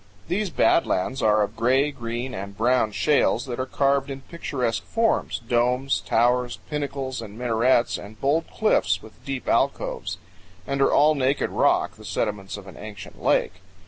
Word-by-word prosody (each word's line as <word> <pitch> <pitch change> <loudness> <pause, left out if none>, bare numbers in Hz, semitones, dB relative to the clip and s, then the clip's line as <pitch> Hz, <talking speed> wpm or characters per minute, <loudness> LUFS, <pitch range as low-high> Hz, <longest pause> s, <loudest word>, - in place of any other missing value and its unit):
These 200 +2 0
bad 170 - +3
lands 125 +8 -1
are 105 0 +4
of 105 +2 -4
gray, 130 +6 +2
green, 120 -1 -5
and 100 0 -7
brown 120 -1 +2
shales 145 +7 +2
that 125 -2 -5
are 130 - -2
carved 140 0 +1
in 135 0 -6
picturesque 130 -7 -3
forms 225 - 0
domes, 125 +3 +1
towers, 120 +1 +2
pinnacles, 140 -4 -3
and 105 -1 -9
minarets, 120 0 +2
and 105 +1 -11
bold 145 +6 +1
cliffs 100 - +1
with 110 - -15
deep 135 -2 -4
alcoves; - - 0 0.5
and 140 0 -2
all 145 +2 +5
are - - 0
naked 135 +2 +1
rock, - - +2
the - - -13
sediments 105 -2 -3
of 100 - -10
an 95 -4 -12
ancient 105 -2 -10
lake. - - +1
125 Hz, 165 wpm, -24 LUFS, 110-140 Hz, 0.5 s, all